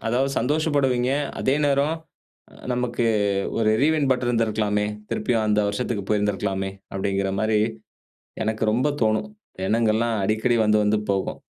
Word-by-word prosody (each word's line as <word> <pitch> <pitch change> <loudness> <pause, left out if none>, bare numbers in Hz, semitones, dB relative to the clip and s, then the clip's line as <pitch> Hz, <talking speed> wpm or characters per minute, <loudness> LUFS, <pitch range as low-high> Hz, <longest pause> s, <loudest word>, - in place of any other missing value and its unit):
அதாவது 130 +4 +1
சந்தோஷப்படுவீங்க. 135 -2 +1 0.3
அதே 130 - +2
நேரம் 140 +2 +2 0.8
நமக்கு 120 -1 -1 0.5
"ஒரு 110 -1 +3
ரீவைன்ட் 150 -2 +2
பட்டன் 125 -1 -2
இருந்திருக்கலாமே! 110 -3 +1 0.2
திருப்பியும் 110 0 0
அந்த 105 0 +2
வருஷத்துக்கு 105 -1 -2
போயிருந்திருக்கலாமே!" 100 -2 0 0.2
அப்பிடிங்கிறமாரி 100 +2 0 0.8
எனக்கு 110 +1 -1
ரொம்ப 130 +6 +2
தோணும். 110 - +1 0.4
எண்ணங்கள்லாம் 115 +1 +1
அடிக்கடி 110 +4 +1
வந்து 105 0 +4
வந்து 105 +1 +2
போகும். 95 -1 -2
110 Hz, 115 wpm, -23 LUFS, 105-125 Hz, 0.8 s, வந்து